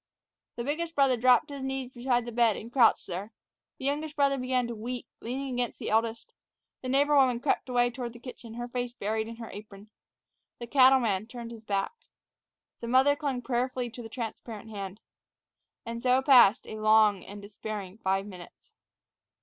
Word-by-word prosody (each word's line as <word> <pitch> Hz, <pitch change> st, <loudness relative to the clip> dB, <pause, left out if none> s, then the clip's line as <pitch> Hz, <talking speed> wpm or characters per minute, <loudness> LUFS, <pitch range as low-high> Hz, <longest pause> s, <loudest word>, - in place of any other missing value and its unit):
The 235 Hz, -, -4 dB
biggest 325 Hz, +5 st, -3 dB
brother 275 Hz, -2 st, +4 dB
dropped 250 Hz, +3 st, +4 dB
to -, -, -7 dB
his 275 Hz, -1 st, -6 dB
knees 265 Hz, -1 st, -3 dB
beside 245 Hz, -1 st, 0 dB
the 240 Hz, -, -6 dB
bed 230 Hz, -2 st, +3 dB
and 230 Hz, -, -9 dB
crouched 240 Hz, -5 st, +4 dB
there. 190 Hz, +4 st, -6 dB, 0.5 s
The 265 Hz, -, -7 dB
youngest 295 Hz, +2 st, -2 dB
brother 275 Hz, -2 st, +2 dB
began 255 Hz, -1 st, 0 dB
to 235 Hz, -, -4 dB
weep, 240 Hz, +3 st, -5 dB
leaning 260 Hz, +3 st, -4 dB
against 245 Hz, -1 st, -2 dB
the -, -, -4 dB
eldest. 225 Hz, +1 st, 0 dB, 0.5 s
The 255 Hz, -, -5 dB
neighbor 285 Hz, +3 st, +3 dB
woman 255 Hz, -4 st, +4 dB
crept 270 Hz, 0 st, 0 dB
away 245 Hz, -1 st, +2 dB
toward 240 Hz, -1 st, -6 dB
the 240 Hz, -, -12 dB
kitchen, 235 Hz, -2 st, -10 dB
her 240 Hz, 0 st, -4 dB
face 245 Hz, 0 st, -4 dB
buried 220 Hz, -1 st, -2 dB
in 230 Hz, -, -7 dB
her 230 Hz, -1 st, -9 dB
apron. 205 Hz, 0 st, -11 dB, 0.7 s
The 240 Hz, -, -6 dB
cattleman 245 Hz, -6 st, +4 dB
turned 235 Hz, -1 st, -8 dB
his 230 Hz, -1 st, -10 dB
back. 200 Hz, -, -1 dB, 0.9 s
The 235 Hz, -, -6 dB
mother 260 Hz, +4 st, +4 dB
clung 280 Hz, -5 st, -3 dB
prayerfully 250 Hz, -1 st, -1 dB
to 245 Hz, -, -9 dB
the 225 Hz, -, -9 dB
transparent 225 Hz, -2 st, -7 dB
hand. 200 Hz, 0 st, -7 dB, 0.8 s
And 230 Hz, 0 st, -5 dB
so 255 Hz, +1 st, +3 dB
passed 250 Hz, -5 st, +6 dB
a 215 Hz, -, -7 dB
long 215 Hz, -2 st, +4 dB
and 205 Hz, +2 st, -10 dB
despairing 205 Hz, -1 st, -7 dB
five 195 Hz, -1 st, 0 dB
minutes. 180 Hz, -4 st, -13 dB
240 Hz, 180 wpm, -28 LUFS, 220-260 Hz, 0.9 s, passed